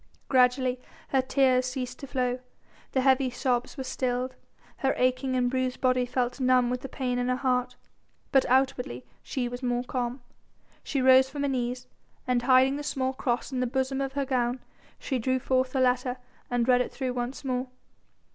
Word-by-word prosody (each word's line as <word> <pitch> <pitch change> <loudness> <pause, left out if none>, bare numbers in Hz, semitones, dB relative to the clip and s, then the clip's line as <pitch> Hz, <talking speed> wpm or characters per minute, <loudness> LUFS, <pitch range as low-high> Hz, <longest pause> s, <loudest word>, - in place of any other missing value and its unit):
Gradually 255 0 +3 0.3
her 265 - +3
tears 260 -1 +2
ceased 255 0 -4
to 275 - -7
flow, 250 -1 -1 0.5
the 260 - +2
heavy 265 0 +3
sobs 245 +1 -1
were 265 - -3
stilled, 255 0 -2 0.4
her 270 -2 +1
aching 255 +1 +1
and 250 -1 +2
bruised 255 0 -1
body 255 -1 +2
felt 250 +1 -1
numb 255 -1 +3
with 250 0 -2
the 270 - -7
pain 250 -2 -2
in 245 0 0
her 250 - +2
heart. 250 -1 0 0.6
But 270 -2 +5
outwardly 250 - +1 0.2
she 250 -3 -3
was 245 +1 -6
more 245 -1 0
calm. 245 0 -3 0.6
She 270 -3 -1
rose 260 0 +6
from 285 +1 -4
her - - +1
knees, 250 -1 -2 0.4
and 250 -1 +1
hiding 260 +2 +4
the 295 - -5
small 265 -2 -1
cross 245 0 -2
in 260 - -2
the 250 - +1
bosom 265 +2 -1
of 270 0 -3
her 280 0 -1
gown, 250 -1 0 0.4
she 260 -3 -2
drew 260 +3 +1
forth 260 0 0
the 265 - -1
letter 250 0 +1 0.3
and 245 -1 0
read 250 -1 +5
it - - -3
through 260 -2 -3
once 250 +3 -4
more. 255 0 -1
255 Hz, 185 wpm, -27 LUFS, 250-265 Hz, 0.6 s, rose